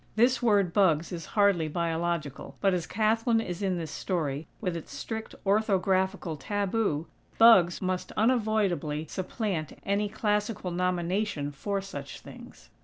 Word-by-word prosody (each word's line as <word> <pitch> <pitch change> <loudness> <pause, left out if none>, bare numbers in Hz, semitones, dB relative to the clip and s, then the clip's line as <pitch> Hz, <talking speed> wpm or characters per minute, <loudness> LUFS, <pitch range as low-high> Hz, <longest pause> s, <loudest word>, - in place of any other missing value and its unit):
(This 245 +4 +3
word, 200 -7 +3
"bugs," 170 -5 +3
is 170 -3 -6
hardly 200 -6 +4
Biological; 165 -2 -2
but 195 -2 +2
as 175 -2 -2
Kathlyn 225 +3 +2
is 180 -4 -4
in 190 -2 0
this 160 -3 -5
story, 155 -5 -2
with 180 -5 -2
its 165 - -7
strict 220 -1 -5
orthographical 190 -4 +1
taboo, 200 -4 -1 0.3
"bugs" 195 -7 +6
must 185 0 -2
unavoidably 210 - +1
supplant 185 - -3
any 200 +1 0
classical 210 -2 -1
nomination 180 -2 -1
for 195 +8 -3
such 145 -8 -8
things.) - - -13
190 Hz, 130 wpm, -28 LUFS, 170-210 Hz, 0.3 s, bugs